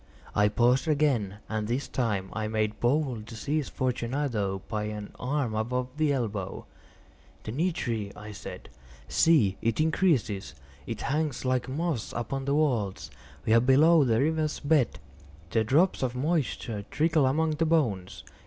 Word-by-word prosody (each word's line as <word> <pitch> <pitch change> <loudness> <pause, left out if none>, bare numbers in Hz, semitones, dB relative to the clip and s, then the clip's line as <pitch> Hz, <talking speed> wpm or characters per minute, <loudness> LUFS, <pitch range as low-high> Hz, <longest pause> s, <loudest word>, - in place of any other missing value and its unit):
I 105 0 +4
paused 125 +7 +2
again, 135 -10 +1
and 110 -1 -2
this 125 +5 -1
time 105 -7 -1
I 110 -1 -2
made 110 -1 -1
bold 125 -4 0
to 115 - -9
seize 145 +6 -2
Fortunato 120 -6 -1
by 105 -1 -2
an 105 -1 -5
arm 130 -3 -1
above 125 +4 -1
the 155 -2 +2
elbow. 110 -8 -3 0.8
"The 110 - -5
nitre!" 120 - -1
I 105 +1 -9
said: 105 - -9 0.4
"see, 120 - +3
it 115 +3 0
increases. 155 - +1 0.3
It 115 -2 -4
hangs 145 -2 -1
like 130 0 0
moss 150 -4 -2
upon 135 +3 -3
the 140 - +1
vaults. 125 -11 0 0.3
We 110 - +3
are 115 - +7
below 150 +5 +6
the 115 -4 +2
river's 155 +1 0
bed. 145 -4 +2 0.5
The 110 - +2
drops 155 - +3
of 125 -2 -1
moisture 130 -7 -1
trickle 155 -3 +2
among 155 +4 +1
the 155 +1 0
bones. 115 - 0
125 Hz, 150 wpm, -28 LUFS, 110-150 Hz, 0.8 s, are